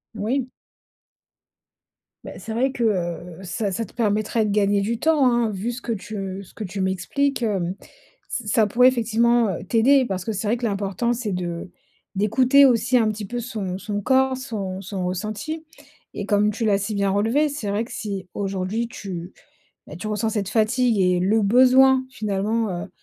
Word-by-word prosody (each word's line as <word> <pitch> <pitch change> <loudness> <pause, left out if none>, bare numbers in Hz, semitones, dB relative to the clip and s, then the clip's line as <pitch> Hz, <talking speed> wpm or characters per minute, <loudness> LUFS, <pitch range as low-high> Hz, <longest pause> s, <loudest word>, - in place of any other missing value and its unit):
Oui. 245 +5 -1 1.7
Beh, - - -8
c'est 225 - -6
vrai 260 +4 +1
que, 250 -3 -3
heu, 175 -4 -2
ça 200 +2 -2
ça 225 +5 -2
te - - -18
permettrait 215 0 0
de 210 - -1
gagner 200 -1 +2
du 225 +3 -2
temps, 310 -3 +3
hein. 240 -3 +2
Vu 205 +4 -3
ce 245 +1 -7
que 235 - -4
tu 200 -3 -5
ce - - -18
que 220 - -6
tu 195 0 -4
m'expliques, 240 +9 -1
hem, 190 -4 -1 0.5
ç 245 -7 -4
ça 215 +1 +3
pourrait 250 +4 +5
effectivement, 235 -1 +2
heu, 175 - -4
t'aider. 250 +7 +4
Parce 185 -4 -4
que 225 - -1
c'est 205 +1 -3
vrai 230 +4 +1
que 240 - -3
l'important, 200 +2 -1
c'est 230 -4 -3
de 175 -1 -4 0.5
d'écouter 255 +8 +5
aussi 250 0 +3
un 225 -3 +3
petit 210 0 -6
peu 240 +5 -4
son 215 -6 -4
son 205 +1 -4
corps, 265 +3 +3
son 200 -7 -5
son 190 -1 -4
ressenti 215 - -4 0.5
et 205 - -4
comme 210 +1 +2
tu 225 +2 -3
l'as 200 -2 +3
si 205 +2 -3
bien 200 -1 +1
relevé, 225 +10 +2
c'est 275 -8 -4
vrai 205 +3 0
que - - -14
si 195 -4 -5
aujourd'hui, 195 +3 -2
tu, 185 -6 -7 0.5
beh, 150 - -9
tu 215 +5 -5
ressens 215 +1 -1
cette 200 -3 -2
fatigue 230 0 +2
et 180 -1 +3
le 205 +5 +2
besoin 260 +4 +5
finalement, 215 -1 -1 0.2
heu, - - -12
215 Hz, 190 wpm, -23 LUFS, 195-240 Hz, 1.7 s, pourrait